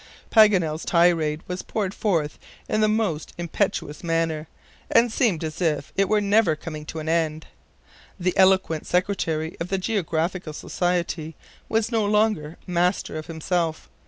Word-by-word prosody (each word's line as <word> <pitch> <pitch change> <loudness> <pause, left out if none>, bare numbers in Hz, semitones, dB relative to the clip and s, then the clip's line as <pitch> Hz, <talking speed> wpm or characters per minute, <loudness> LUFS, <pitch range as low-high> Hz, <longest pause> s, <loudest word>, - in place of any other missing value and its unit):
'" - - -28
Paganel's 180 -8 +5
tirade 165 -3 +2
was 180 0 -4
poured 200 -3 -3
forth 165 -10 -1 0.3
in 215 - +1
the 215 - +4
most 210 -8 -1
impetuous 170 -3 -2
manner, 165 -2 -1 0.4
and 230 0 +4
seemed 200 - +1
as 155 +3 -5
if 155 -4 0
it 195 0 +2
were 215 - +4
never 205 -4 +3
coming 155 -1 -8
to - - -6
an 155 0 -5
end. 160 -1 0 0.7
The 180 0 0
eloquent 190 -4 +3
secretary 170 -4 0
of 170 - -3
the 195 - -1
Geographical 180 -4 -1
Society 170 -1 -2 0.3
was 225 +1 +1
no 225 -2 +2
longer 205 -7 +1
master 180 0 0
of 155 0 -5
himself. 165 0 -2
175 Hz, 150 wpm, -24 LUFS, 160-200 Hz, 0.7 s, Paganel's